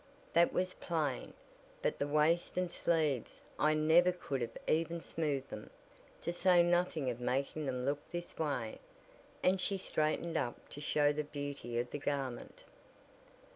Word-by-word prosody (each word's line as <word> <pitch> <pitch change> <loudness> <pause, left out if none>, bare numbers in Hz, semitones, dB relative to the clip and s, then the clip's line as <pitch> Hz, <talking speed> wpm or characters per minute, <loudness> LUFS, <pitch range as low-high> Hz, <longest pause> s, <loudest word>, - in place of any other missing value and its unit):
"That 170 +1 +5
was 185 0 0
plain, 155 -6 -2 0.5
but - - 0
the - - 0
waist 155 +5 +2
and 180 -1 0
sleeves 155 -9 0 0.2
I 155 +1 +4
never 160 +4 +5
could 140 -7 -3
have 115 -1 -3
even 165 +1 +1
smoothed 145 -4 -2
them, 105 - -7 0.5
to 170 - -1
say 175 -1 +5
nothing 175 -6 +2
of 120 - -7
making 140 +4 -1
them 125 -1 -2
look 145 +1 +1
this 175 0 -5
way," 140 -8 -1 0.6
and 185 0 +3
she 195 +1 0
straightened 165 -2 0
up 120 -3 -3
to 145 - -8
show 145 0 +3
the 150 +1 -1
beauty 145 -5 -5
of 120 +1 -1
the 145 - -3
garment. 135 -3 -3
150 Hz, 155 wpm, -34 LUFS, 135-170 Hz, 0.6 s, That